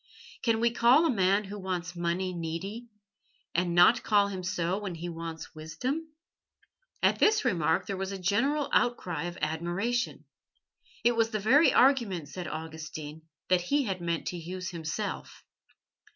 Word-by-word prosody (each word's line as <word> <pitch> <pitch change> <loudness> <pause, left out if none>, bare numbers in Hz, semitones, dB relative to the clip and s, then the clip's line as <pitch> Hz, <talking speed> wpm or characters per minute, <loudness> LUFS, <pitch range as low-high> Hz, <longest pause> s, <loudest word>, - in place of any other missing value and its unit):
Can 230 -2 +2
we 235 0 +3
call 245 +7 +5
a 325 - +3
man 195 -1 +2
who 205 +1 -7
wants 180 -2 -4
money 175 +2 -1
needy, 175 +8 -5 0.7
and 175 0 0
not 195 +7 +6
call 205 -2 +3
him 190 -2 -5
so 180 0 -1
when 195 -4 -5
he 170 +2 -5
wants 165 -1 -7
wisdom?" 250 - -4 0.9
At - - +3
this 435 +1 +4
remark - - +1
there 200 - -3
was 190 +1 -3
a 195 - -4
general 240 +11 +1
outcry 175 -10 +1
of 175 +1 -5
admiration. 175 +10 -1 0.8
It 240 0 +4
was 225 -1 +2
the 215 -2 -2
very 265 +10 +5
argument, 230 - +3
said 180 +2 -6
Augustine, 155 -1 -7 0.2
that 185 -1 +4
he 280 +11 +1
had 190 -6 -3
meant 170 -1 -2
to 180 - -5
use 185 +3 -5
himself. 160 -3 -5
185 Hz, 155 wpm, -29 LUFS, 170-230 Hz, 0.9 s, not